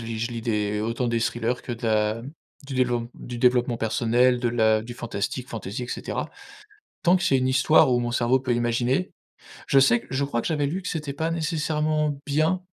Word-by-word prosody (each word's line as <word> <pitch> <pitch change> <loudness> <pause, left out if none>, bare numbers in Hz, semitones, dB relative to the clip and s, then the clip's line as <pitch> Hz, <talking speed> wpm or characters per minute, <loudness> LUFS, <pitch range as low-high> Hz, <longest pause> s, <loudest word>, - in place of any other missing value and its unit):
lis 115 -1 -4
je 115 +1 -2
lis 115 -1 -5
des 105 -2 -1
autant 115 +3 -1
des 115 -1 0
thrillers 120 +2 -1
que 120 - -5
de 115 0 -5
la 110 +1 +1 0.4
du 140 - -6
développe 120 -2 0
du 120 -1 -8
développement 125 -1 +3
personnel, 120 +2 +2
de 120 - +1
la 110 -2 +2
du 120 +1 -8
fantastique, 120 +2 -4
fantaisie, 115 +1 -5
et - - -11
cetera. - - -4 0.8
Tant 180 +1 +5
que 175 - -4
c'est 135 - +3
une 130 0 +1
histoire 135 +1 +4
où 120 - +3
mon 120 0 -2
cerveau 120 +2 +2
peut 125 -2 -1
imaginer, 120 +7 0 0.6
je 135 - +5
sais 120 -3 +5
que 120 - -18
je 135 +2 0
crois 120 -4 -1
que - - -6
j'avais 150 -3 0
lu 180 +7 -3
que - - -5
c'était 150 -4 -3
pas 160 +4 -2
nécessairement 155 -2 -1
bien 155 +6 +1
125 Hz, 210 wpm, -25 LUFS, 115-140 Hz, 0.8 s, Tant